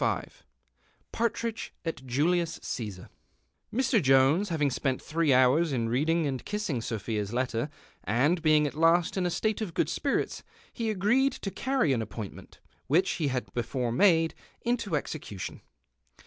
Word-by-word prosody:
'21 -, -, 0 dB, 0.8 s
PARTRIDGE 230 Hz, -1 st, -2 dB
AT 165 Hz, -5 st, -4 dB
JULIUS 165 Hz, +6 st, +1 dB
CESAR" 100 Hz, -6 st, -5 dB, 0.6 s
Mr, 250 Hz, -2 st, +2 dB
Jonks 135 Hz, +8 st, +4 dB
ha\ing 150 Hz, -4 st, +1 dB
spent 130 Hz, 0 st, -1 dB
throe 160 Hz, -2 st, 0 dB
hours 130 Hz, +6 st, +4 dB
in 115 Hz, -4 st, 0 dB
reading 155 Hz, +7 st, +1 dB
and 135 Hz, -3 st, -2 dB
kissing 210 Hz, -, -2 dB
Sophia's 110 Hz, -2 st, -3 dB
letter, 125 Hz, +2 st, -1 dB, 0.3 s
and 140 Hz, -, +2 dB
being 155 Hz, -1 st, +4 dB
at 145 Hz, -, -2 dB
hist 165 Hz, +2 st, +3 dB
in 185 Hz, -2 st, +1 dB
a -, -, 0 dB
state 215 Hz, +5 st, -1 dB
of 195 Hz, -6 st, -4 dB
good -, -, +1 dB
spirits, -, -, -1 dB, 0.3 s
he 230 Hz, -2 st, -2 dB
agreed 230 Hz, +7 st, +2 dB
to 195 Hz, -, -5 dB, 0.2 s
earry 260 Hz, -, +3 dB
an 120 Hz, -, 0 dB
appoint 110 Hz, -1 st, -6 dB
ment, -, -, -14 dB, 0.3 s
whieh 170 Hz, +7 st, +4 dB
he 155 Hz, -, 0 dB
had 130 Hz, -2 st, -3 dB
before 120 Hz, 0 st, -2 dB
made, 165 Hz, -, +4 dB, 0.3 s
into 235 Hz, -7 st, -1 dB
exeeution. 140 Hz, -9 st, -5 dB
155 Hz, 150 wpm, -28 LUFS, 125-185 Hz, 0.8 s, Jonks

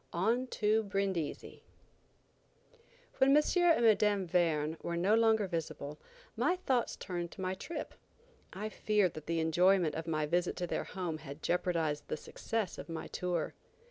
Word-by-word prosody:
ON 225 Hz, +9 st, +1 dB
TO 215 Hz, -2 st, +2 dB
BRINDISI. 195 Hz, -6 st, -3 dB, 1.6 s
WHEN 275 Hz, +2 st, +6 dB
M. 300 Hz, -, +5 dB
and 335 Hz, -9 st, +4 dB, 0.2 s
Mme. 205 Hz, -2 st, +2 dB
Verne 165 Hz, -3 st, +1 dB
were 170 Hz, 0 st, -3 dB
no 190 Hz, +5 st, +3 dB
longer 220 Hz, -2 st, +4 dB
visible, 155 Hz, -4 st, -4 dB, 0.4 s
my 360 Hz, -, +2 dB
thoughts 265 Hz, -10 st, 0 dB
turned 175 Hz, -2 st, -4 dB
to -, -, -9 dB
my 185 Hz, 0 st, -1 dB
trip. 300 Hz, -, -6 dB, 0.6 s
I 205 Hz, +3 st, -4 dB
feared 210 Hz, -4 st, +1 dB
that 155 Hz, -1 st, -9 dB
the 165 Hz, 0 st, 0 dB
enjoyment 175 Hz, +1 st, +3 dB
of 160 Hz, +2 st, -5 dB
my 155 Hz, -2 st, 0 dB
visit 175 Hz, +4 st, 0 dB
to 180 Hz, -, -2 dB
their -, -, -2 dB
home 175 Hz, -5 st, -4 dB
had 145 Hz, 0 st, -10 dB
jeopardized 165 Hz, -4 st, 0 dB
the -, -, -3 dB
success 220 Hz, +4 st, -3 dB
of -, -, -8 dB
my 165 Hz, -1 st, -5 dB
tour. 175 Hz, -3 st, -2 dB
180 Hz, 155 wpm, -33 LUFS, 165-215 Hz, 1.6 s, WHEN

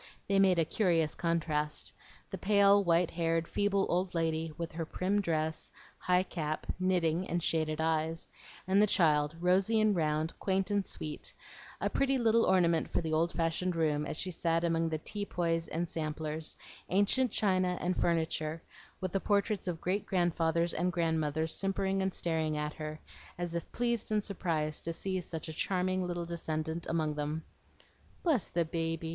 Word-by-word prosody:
They 195 Hz, 0 st, +3 dB
made 190 Hz, -2 st, +5 dB
a 165 Hz, -, +3 dB
curious 165 Hz, -5 st, +1 dB
contrast, 155 Hz, -3 st, -1 dB, 0.4 s
the 190 Hz, -, -3 dB
pale, 200 Hz, 0 st, +5 dB
white 170 Hz, -1 st, +3 dB
haired, 165 Hz, -1 st, 0 dB
feeble 200 Hz, -1 st, +1 dB
old 180 Hz, +1 st, 0 dB
lady, 160 Hz, -1 st, 0 dB
with 170 Hz, -1 st, -4 dB
her 165 Hz, +1 st, -3 dB
prim 190 Hz, +5 st, 0 dB
dress, 160 Hz, -3 st, -1 dB, 0.3 s
high 180 Hz, 0 st, +3 dB
cap, 155 Hz, -4 st, -3 dB
knitting, 180 Hz, -1 st, +1 dB
and 175 Hz, -1 st, -1 dB
shaded 155 Hz, -1 st, 0 dB
eyes; 160 Hz, 0 st, 0 dB, 0.4 s
and 195 Hz, +2 st, +4 dB
the 210 Hz, -, +5 dB
child, 150 Hz, -4 st, +3 dB
rosy 185 Hz, +5 st, +3 dB
and 215 Hz, -2 st, +3 dB
round, 155 Hz, 0 st, 0 dB
quaint 195 Hz, +1 st, 0 dB
and 200 Hz, -1 st, +1 dB
sweet, 155 Hz, -1 st, -5 dB, 0.5 s
a -, -, 0 dB
pretty 270 Hz, -1 st, +1 dB
little 230 Hz, -1 st, +4 dB
ornament 170 Hz, -3 st, +3 dB
for -, -, 0 dB
the 160 Hz, -2 st, -2 dB
old 165 Hz, +2 st, +2 dB
fashioned 170 Hz, +2 st, -1 dB
room, 150 Hz, -2 st, +1 dB
as -, -, -4 dB
she 185 Hz, -, -2 dB
sat 165 Hz, 0 st, 0 dB
among 165 Hz, -1 st, +1 dB
the 160 Hz, -, -1 dB
tea 205 Hz, +6 st, -4 dB
poys 165 Hz, -3 st, -1 dB
and 170 Hz, +2 st, -2 dB
samplers, 155 Hz, 0 st, -4 dB, 0.3 s
ancient 205 Hz, +7 st, +3 dB
china 185 Hz, -4 st, +1 dB
and 180 Hz, +1 st, 0 dB
furniture, 160 Hz, -1 st, 0 dB, 0.4 s
with 185 Hz, -2 st, -2 dB
the 195 Hz, -, +1 dB
portraits 205 Hz, 0 st, 0 dB
of 170 Hz, -2 st, -2 dB
great 190 Hz, +4 st, -1 dB
grandfathers 170 Hz, -2 st, +1 dB
and 180 Hz, +2 st, 0 dB
grandmothers 160 Hz, -2 st, 0 dB
simpering 195 Hz, 0 st, 0 dB
and 190 Hz, 0 st, 0 dB
staring 160 Hz, -2 st, 0 dB
at 150 Hz, 0 st, -2 dB
her, 155 Hz, 0 st, -6 dB, 0.4 s
as 175 Hz, -1 st, -3 dB
if 170 Hz, -, -4 dB
pleased 235 Hz, -3 st, -1 dB
and 210 Hz, -1 st, +2 dB
surprised 160 Hz, -6 st, -2 dB
to 165 Hz, -, -3 dB
see 190 Hz, +2 st, -2 dB
such 165 Hz, -1 st, -6 dB
a 160 Hz, -, -5 dB
charming 185 Hz, +2 st, 0 dB
little 175 Hz, -1 st, -3 dB
descendant 160 Hz, -1 st, -3 dB
among 155 Hz, -2 st, 0 dB
them. 150 Hz, +2 st, -3 dB, 0.8 s
"Bless 305 Hz, -, +2 dB
the 170 Hz, 0 st, +1 dB
baby! 165 Hz, 0 st, -2 dB
170 Hz, 170 wpm, -32 LUFS, 160-190 Hz, 0.8 s, made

